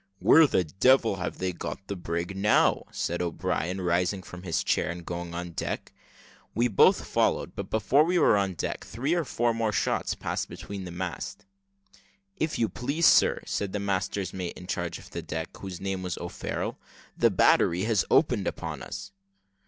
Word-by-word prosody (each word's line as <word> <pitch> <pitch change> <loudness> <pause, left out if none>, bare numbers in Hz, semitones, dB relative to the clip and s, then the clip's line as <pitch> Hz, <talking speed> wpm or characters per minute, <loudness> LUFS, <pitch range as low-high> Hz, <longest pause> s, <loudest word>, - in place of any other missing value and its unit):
"Where 160 +9 +7
the 95 - +2
devil 110 - +3
have 90 - -4
they 95 -1 -2
got 95 +3 -6
the 100 - -4
brig 85 +1 -3
now?" 105 +2 +3
said 85 +1 -2
O'Brien, 90 +1 -2
rising 90 +2 0
from 90 0 -10
his 90 -3 -1
chair, - - +1
and 85 -1 -6
going 85 -1 -5
on 85 0 -4
deck. - - -4 0.6
We 120 +3 +2
both 100 - +5
followed; - - 0
but - - -5
before 110 +7 +3
we 175 +3 +1
were 165 - +5
on 100 -2 0
deck, - - -3
three 135 +8 -2
or 175 -1 +1
four 120 -4 0
more 115 -1 0
shots - - 0
passed - - -3
between 100 -2 -7
the 90 - -7
masts. 90 - -5 0.9
"If 155 -5 -1
you 115 - +2
please, 140 +10 -1
sir," - - +5
said 100 -2 -2
the 105 - -1
master's 100 -1 -2
mate 90 -2 -5
in 90 - -10
charge 85 -2 -3
of - - -14
the - - -4
deck, 80 +1 -5
whose 95 -3 -7
name 95 -1 -3
was 90 -2 -3
O'Farrel, - - -4 0.4
"the - - +4
battery 85 +3 +3
has 110 -4 +2
opened - - +3
upon - - -4
us." 100 0 -7
95 Hz, 185 wpm, -27 LUFS, 90-110 Hz, 0.9 s, Where